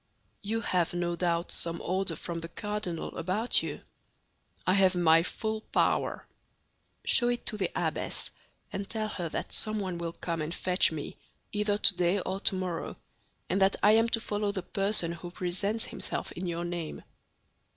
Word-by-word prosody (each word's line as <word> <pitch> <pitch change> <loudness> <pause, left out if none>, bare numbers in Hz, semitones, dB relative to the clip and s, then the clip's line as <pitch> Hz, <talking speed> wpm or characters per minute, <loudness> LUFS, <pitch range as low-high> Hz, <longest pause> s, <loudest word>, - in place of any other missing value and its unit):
"You 225 +3 -1
have, 175 -5 0
no 175 0 0
doubt, 170 0 0
some 170 0 +2
order 185 -2 -1
from 170 +2 -5
the 165 - -6
cardinal 205 -3 -4
about 190 +8 +4
you?" - - -5 0.8
"I 185 - +4
have 190 -1 +4
my 165 -2 +5
full 220 +5 -3
power." - - 0 0.8
"Show 240 - +5
it 240 0 -1
to 215 - 0
the 190 -4 0
abbess, - - -1 0.4
and 195 0 -4
tell 220 -1 -1
her 175 -5 -3
that - - -4
someone 200 -5 0
will 170 -1 -3
come 165 -2 -3
and 155 +3 -3
fetch 180 -1 +3
me, 155 -2 -6 0.3
either 210 -1 +1
today 180 -1 +4
or 190 +1 -3
tomorrow, 185 -4 -1 0.5
and 195 +2 0
that 195 +1 +4
I 205 - +8
am 225 +1 +4
to 230 - +1
follow 210 -2 -1
the 190 -3 -4
person 195 -3 +1
who 170 +1 -7
presents 190 +5 0
himself - - -4
in 180 +1 -4
your 170 0 -2
name." 175 -2 -4
185 Hz, 165 wpm, -29 LUFS, 170-210 Hz, 0.8 s, I